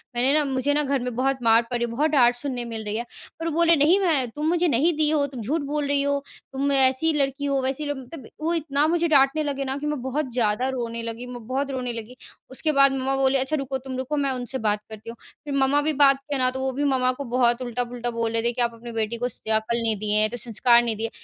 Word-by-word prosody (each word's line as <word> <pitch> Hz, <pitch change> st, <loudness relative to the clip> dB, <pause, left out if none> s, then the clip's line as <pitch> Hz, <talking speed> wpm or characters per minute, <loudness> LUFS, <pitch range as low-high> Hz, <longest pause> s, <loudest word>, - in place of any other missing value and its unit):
मैंने 255 Hz, +3 st, +3 dB
ना 300 Hz, -, +3 dB
मुझे 270 Hz, +1 st, 0 dB
ना 295 Hz, +1 st, +1 dB
घर 275 Hz, -1 st, 0 dB
में 250 Hz, -2 st, -4 dB
बहुत 265 Hz, +2 st, 0 dB
मार 225 Hz, 0 st, +6 dB
पड़ी 240 Hz, -1 st, 0 dB
है, -, -, -6 dB
बहुत 295 Hz, +7 st, +1 dB
डाँट 245 Hz, -5 st, +4 dB
सुनने 245 Hz, -1 st, -4 dB
मिल 225 Hz, -2 st, -6 dB
रही 210 Hz, 0 st, -3 dB
है 235 Hz, -, -3 dB, 0.3 s
पर 330 Hz, -, -4 dB
वो -, -, -1 dB
बोले 335 Hz, +1 st, +4 dB
नहीं 315 Hz, +6 st, +4 dB
मैं 305 Hz, -10 st, +1 dB
तुम 300 Hz, +6 st, -4 dB
मुझे 350 Hz, +1 st, +2 dB
नहीं 305 Hz, +5 st, +2 dB
दी 305 Hz, -1 st, +3 dB
हो, 300 Hz, -2 st, +2 dB
तुम 260 Hz, -4 st, -8 dB
झूठ 295 Hz, +9 st, -1 dB
बोल 285 Hz, 0 st, -2 dB
रही 285 Hz, 0 st, +2 dB
हो, 280 Hz, 0 st, -1 dB, 0.3 s
तुम 275 Hz, +1 st, 0 dB
ऐसी 270 Hz, +3 st, +3 dB
लड़की 280 Hz, -1 st, -1 dB
हो 275 Hz, -1 st, 0 dB
वैसी 270 Hz, +3 st, -2 dB
मतलब 265 Hz, 0 st, -10 dB
वो 325 Hz, +2 st, 0 dB
इतना 295 Hz, -3 st, +1 dB
मुझे 340 Hz, +1 st, +1 dB
डाँटने 290 Hz, 0 st, +3 dB
लगे 280 Hz, -1 st, -2 dB
ना 265 Hz, +1 st, -3 dB
कि 290 Hz, -, -6 dB
मैं 295 Hz, -3 st, -2 dB
बहुत 265 Hz, +1 st, -3 dB
ज़्यादा 240 Hz, +1 st, +1 dB
रोने 235 Hz, -3 st, -4 dB
लगी, 230 Hz, +1 st, -6 dB
मैं 245 Hz, -2 st, -9 dB
बहुत 275 Hz, +2 st, -2 dB
रोने 250 Hz, -2 st, -3 dB
लगी। 230 Hz, +2 st, -8 dB, 0.3 s
उसके 305 Hz, +4 st, -1 dB
बाद 275 Hz, -1 st, +5 dB
मम्मा 270 Hz, 0 st, -1 dB
बोले 270 Hz, 0 st, +2 dB
अच्छा 265 Hz, +4 st, -1 dB
रुको, 275 Hz, -2 st, -3 dB
तुम 260 Hz, 0 st, -7 dB
रुको 260 Hz, +3 st, -3 dB
मैं 275 Hz, -2 st, 0 dB
उनसे 250 Hz, +1 st, -4 dB
बात 210 Hz, -3 st, 0 dB
करती 220 Hz, +1 st, -10 dB
हूँ, 230 Hz, -, -7 dB, 0.3 s
फिर 290 Hz, -, -4 dB
मम्मा 275 Hz, +1 st, +3 dB
भी 310 Hz, +1 st, 0 dB
बात 275 Hz, -1 st, +5 dB
किया 275 Hz, 0 st, -4 dB
ना 255 Hz, 0 st, +3 dB
तो 260 Hz, -, -6 dB
वो 265 Hz, 0 st, -1 dB
भी 280 Hz, +3 st, -2 dB
मम्मा 260 Hz, -3 st, +2 dB
को 280 Hz, -, -4 dB
बहुत 240 Hz, -1 st, +3 dB
उल्टा-पुल्टा 245 Hz, 0 st, -3 dB
बोल 230 Hz, -1 st, -2 dB
रहे 230 Hz, -, 0 dB
थे 235 Hz, -, +1 dB
कि 245 Hz, -, -2 dB
आप 235 Hz, -1 st, 0 dB
अपनी 235 Hz, +1 st, -10 dB
बेटी 225 Hz, 0 st, -2 dB
को -, -, +2 dB
स 245 Hz, -, -11 dB
अक्ल 220 Hz, +1 st, 0 dB
नहीं 235 Hz, -1 st, -1 dB
दिए 210 Hz, +1 st, -1 dB
हैं, 215 Hz, -, +2 dB
तो 245 Hz, -, -6 dB
संस्कार 235 Hz, +1 st, +3 dB
नहीं 230 Hz, -2 st, -1 dB
दिए 225 Hz, +2 st, -3 dB
265 Hz, 270 wpm, -24 LUFS, 240-285 Hz, 0.3 s, मार